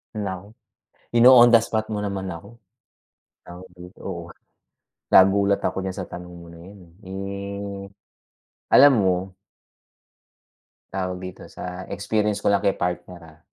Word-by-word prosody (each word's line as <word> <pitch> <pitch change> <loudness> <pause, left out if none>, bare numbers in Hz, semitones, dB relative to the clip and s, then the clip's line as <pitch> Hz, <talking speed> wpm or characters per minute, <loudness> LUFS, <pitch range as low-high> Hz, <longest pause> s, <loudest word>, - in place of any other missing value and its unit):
Naku, 100 0 -6 0.6
ino-on 120 0 +8
the 120 - +7
spot 110 -1 -3
mo 110 - -3
naman 100 -2 -4
ako. 100 +8 -10 0.8
Tawag 90 +1 -12
dito, 90 +1 -14
oo 85 -3 -5 0.9
nagulat 100 +1 +5
ako - - -1
diyan 95 -1 -4
sa 95 - -4
tanong 90 0 -9
mo 85 0 -13
na 85 - -14
yan, 100 +4 -13
eh. 85 -1 -22
Eh, 100 +1 -6 0.9
alam 140 +1 +7
mo 95 -1 +3 1.8
Tawag 90 -1 -3
dito 90 -1 -9
sa 90 +1 -8
experience 105 0 -1
ko - - +1
lang 100 - +2
kay 100 - +1
partner, 90 0 -4
ah. 80 -1 -18
95 Hz, 135 wpm, -23 LUFS, 90-100 Hz, 1.8 s, ino-on